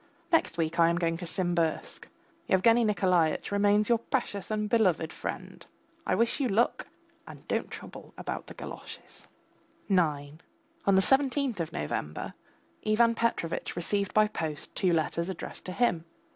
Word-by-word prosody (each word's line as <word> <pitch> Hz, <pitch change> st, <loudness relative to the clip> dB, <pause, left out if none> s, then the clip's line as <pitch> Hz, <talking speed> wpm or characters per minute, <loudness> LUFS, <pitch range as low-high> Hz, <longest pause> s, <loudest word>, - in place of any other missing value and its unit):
Next 330 Hz, -, +2 dB
week 165 Hz, 0 st, -1 dB
I 165 Hz, 0 st, +6 dB
am 170 Hz, -, +1 dB
going 165 Hz, -1 st, 0 dB
to 175 Hz, 0 st, -7 dB
Simbirsk. 175 Hz, -, -1 dB, 0.4 s
Yevgany 230 Hz, +5 st, +5 dB
Nikolaitch 185 Hz, -7 st, +2 dB
remains 205 Hz, +1 st, +3 dB
your 235 Hz, -1 st, +3 dB
precious 220 Hz, -5 st, -3 dB
and 210 Hz, -1 st, -1 dB
beloved 185 Hz, -8 st, +2 dB
friend. -, -, -6 dB, 0.4 s
I -, -, +2 dB
wish 230 Hz, +4 st, +1 dB
you 275 Hz, -, +1 dB
luck, 220 Hz, +4 st, +1 dB, 0.4 s
and -, -, -12 dB
don't -, -, -1 dB
trouble -, -, -10 dB
about -, -, -5 dB
the -, -, -10 dB
galoshes. -, -, -10 dB, 0.6 s
IX 155 Hz, -6 st, 0 dB, 0.5 s
On 195 Hz, -, +5 dB
the 190 Hz, -, +6 dB
seventeenth 270 Hz, -3 st, +2 dB
of 165 Hz, -2 st, -2 dB
November 75 Hz, 0 st, -4 dB, 0.5 s
Ivan 230 Hz, +2 st, +4 dB
Petrovitch 230 Hz, -8 st, -1 dB
received 200 Hz, +3 st, -1 dB
by 215 Hz, 0 st, +6 dB
post 155 Hz, -7 st, -5 dB
two 185 Hz, -, +1 dB
letters 170 Hz, +2 st, 0 dB
addressed 190 Hz, -, -7 dB
to 185 Hz, -, -4 dB
him. 180 Hz, -6 st, +1 dB
190 Hz, 150 wpm, -29 LUFS, 165-225 Hz, 0.6 s, I